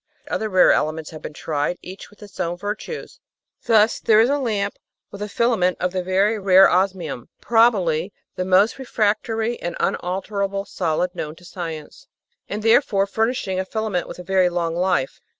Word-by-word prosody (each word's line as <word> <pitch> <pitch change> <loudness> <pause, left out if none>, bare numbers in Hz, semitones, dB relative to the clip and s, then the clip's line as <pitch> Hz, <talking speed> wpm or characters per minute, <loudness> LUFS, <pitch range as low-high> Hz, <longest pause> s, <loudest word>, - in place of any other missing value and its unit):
Other 220 - -2
rare 185 -2 +5
elements 155 0 -2
have 155 -1 -10
been - - -6
tried, 150 +3 -2
each 185 +2 -10
with 210 +1 -16
its 205 -2 -14
own 170 +1 -2
virtues. 210 - -6 0.5
Thus 225 -1 +4
there 215 -1 +4
is 235 +4 +4
a 290 - +1
lamp 210 -6 -2 0.3
with 200 - -9
a 210 - -4
filament 215 -6 +1
of 180 0 0
the 185 0 -2
very 195 +4 +1
rare 190 -1 +6
osmium, 180 -9 -1
"probably 200 -7 +2 0.2
the 185 - -2
most 190 +6 +3
refractory 225 -1 -1
and 175 - -4
unalterable 195 +2 -2
solid 175 -1 -1
known 155 -4 -5
to 180 - -17
science," 165 -4 -8 0.4
and 210 +1 -4
therefore 225 -3 +3
furnishing 220 -2 -1
a - - 0
filament 210 -3 -2
with - - -8
a 180 - -8
very 185 -1 +2
long 170 -1 -2
life. 175 -7 0
190 Hz, 170 wpm, -22 LUFS, 175-215 Hz, 0.5 s, rare